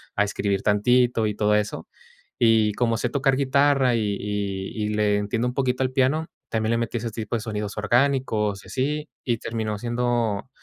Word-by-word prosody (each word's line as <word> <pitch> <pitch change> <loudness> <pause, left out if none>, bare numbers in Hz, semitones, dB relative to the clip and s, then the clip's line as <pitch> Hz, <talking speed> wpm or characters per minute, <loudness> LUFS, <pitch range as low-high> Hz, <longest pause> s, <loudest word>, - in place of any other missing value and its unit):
a 105 - +3
escribir 100 -1 -1
tantito 115 +2 +3
y 105 - -2
todo 105 0 +2
eso. 105 -6 -2 0.5
Y 110 -2 +4
como 115 +1 +1
sé 120 - -1
tocar 135 +1 +1
guitarra 140 -2 +3
y 105 -3 0
y 100 0 -3
y - - -1
le 105 -1 +2
entiendo 105 +4 -1
un 125 - -3
poquito 130 -1 0
al 130 - -1
piano, 135 +5 +1 0.2
también 110 0 0
le 115 - +2
metí 115 0 -2
ese 115 0 -4
tipo 110 0 -4
de - - -4
sonidos 105 -2 -4
orgánicos 110 -3 +1
y - - -13
así, 150 +3 -2
y 120 -2 0
terminó 110 -1 -3
siendo 120 -2 -1
115 Hz, 185 wpm, -24 LUFS, 105-125 Hz, 0.5 s, Y